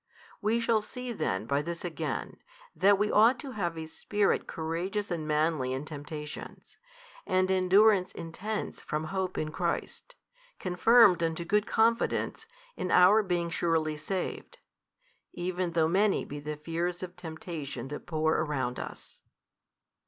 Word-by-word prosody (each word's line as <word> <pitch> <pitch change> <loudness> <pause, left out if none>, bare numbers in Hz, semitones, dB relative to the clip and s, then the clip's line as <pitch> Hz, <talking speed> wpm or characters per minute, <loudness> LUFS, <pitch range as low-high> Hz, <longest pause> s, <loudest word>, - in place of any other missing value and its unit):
We 220 +3 +2
shall 230 -2 +2
see 250 +3 -6
then 230 - -2
by 140 +1 +1
this 170 +3 -5
again, 170 -2 -4 0.4
that 200 +1 +5
we 210 +1 +1
ought 225 +4 +5
to 280 -3 -7
have 175 -7 -2
a 160 - -4
spirit 205 +5 0
courageous 180 +6 -3
and 160 -3 -2
manly 150 -4 +1
in 135 +3 -4
temptations, 150 0 -8 0.5
and 185 0 +2
endurance 190 +1 +4
intense 195 +6 -5
from 150 +1 -3
hope 190 -1 -2
in 155 0 -2
Christ, 175 - -3 0.4
confirmed 185 0 +5
unto 165 0 -1
good 210 +4 +1
confidence 230 - +1 0.3
in 185 - -3
our 190 +5 +6
being 175 -4 -1
surely 165 -2 +1
saved, 180 +5 -4 0.8
even 180 0 -2
though 160 -1 +3
many 195 +4 +2
be 145 - -7
the 150 +1 -5
fears 170 +3 -3
of 180 0 -7
temptation 155 -6 -6
that 150 - -7
pour 160 -1 +1
around 140 -5 -1
us. - - -9
175 Hz, 140 wpm, -29 LUFS, 155-200 Hz, 0.8 s, our